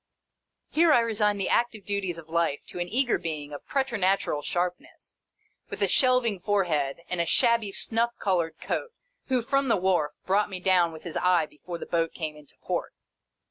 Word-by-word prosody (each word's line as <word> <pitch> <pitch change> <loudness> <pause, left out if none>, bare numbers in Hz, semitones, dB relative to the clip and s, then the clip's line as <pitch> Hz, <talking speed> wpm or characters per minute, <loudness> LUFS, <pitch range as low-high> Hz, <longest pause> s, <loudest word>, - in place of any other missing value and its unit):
Here, 330 +1 +4
I 245 - +6
resign 210 -2 +1
the 195 - -1
active 230 -4 +1
duties 195 -4 -2
of 165 -1 -11
life 165 -3 -1
to - - -7
an 175 - -2
eager 245 +4 +2
being, 150 -3 -5
of 145 - -9
preternatural 200 - 0
sharpness, 180 +3 -4 0.5
with - - -3
a - - +3
shelving 250 -6 +3
forehead 170 -7 0
and 180 -1 -1
a - - 0
shabby 235 -2 +3
snuff 235 +4 0
colored 175 -4 -1
coat, 485 - -3 0.3
who 255 -3 +1
(from 275 +2 +1
the 230 - +3
wharf) 175 -5 +1
brought 205 +3 +2
me 190 -2 -5
down 180 -2 +3
with 160 -1 -11
his 170 - -5
eye 180 -3 +3
before 170 +4 -9
the - - -7
boat 165 -1 -1
came 155 -3 -4
into 150 -2 -17
port. - - -3
185 Hz, 180 wpm, -27 LUFS, 165-230 Hz, 0.5 s, I